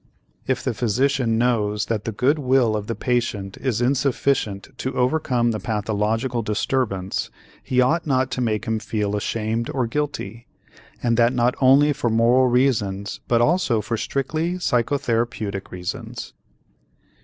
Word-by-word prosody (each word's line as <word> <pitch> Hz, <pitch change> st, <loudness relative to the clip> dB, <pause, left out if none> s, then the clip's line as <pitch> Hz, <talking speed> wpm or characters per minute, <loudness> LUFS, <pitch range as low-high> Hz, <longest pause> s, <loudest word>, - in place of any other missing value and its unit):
If 130 Hz, -1 st, 0 dB
the 130 Hz, -3 st, -1 dB
physician 125 Hz, +1 st, +1 dB
knows 105 Hz, -4 st, +1 dB
that 110 Hz, -2 st, -2 dB
the 115 Hz, -, -2 dB
good 130 Hz, +8 st, +1 dB
will 130 Hz, -5 st, +2 dB
of 105 Hz, -1 st, -4 dB
the 115 Hz, -, -2 dB
patient 110 Hz, -6 st, -1 dB
is 125 Hz, -4 st, -1 dB
insufficient 130 Hz, -5 st, 0 dB
to 130 Hz, 0 st, -3 dB
overcome 125 Hz, -3 st, +1 dB
the 110 Hz, -, -3 dB
pathological 110 Hz, +3 st, -1 dB
disturbance, 105 Hz, -3 st, -1 dB, 0.3 s
he 125 Hz, -1 st, +2 dB
ought 160 Hz, +6 st, +1 dB
not 130 Hz, -2 st, +1 dB
to 125 Hz, -, -2 dB
make 110 Hz, -3 st, -1 dB
him 110 Hz, -1 st, -1 dB
feel 105 Hz, -1 st, -2 dB
ashamed 110 Hz, +2 st, -2 dB
or 130 Hz, -3 st, 0 dB
guilty, 115 Hz, -4 st, -4 dB, 0.6 s
and 115 Hz, -1 st, +2 dB
that 120 Hz, +1 st, +4 dB
not 125 Hz, 0 st, +2 dB
only 140 Hz, +3 st, +5 dB
for 120 Hz, -, -1 dB
moral 120 Hz, +3 st, +4 dB
reasons 110 Hz, -6 st, 0 dB
but 120 Hz, -1 st, +3 dB
also 150 Hz, -5 st, +2 dB
for 110 Hz, +2 st, -2 dB
strictly 155 Hz, +8 st, -2 dB
psychotherapeutic 115 Hz, -, -1 dB
reasons. 90 Hz, -1 st, -6 dB
120 Hz, 145 wpm, -22 LUFS, 110-130 Hz, 0.6 s, only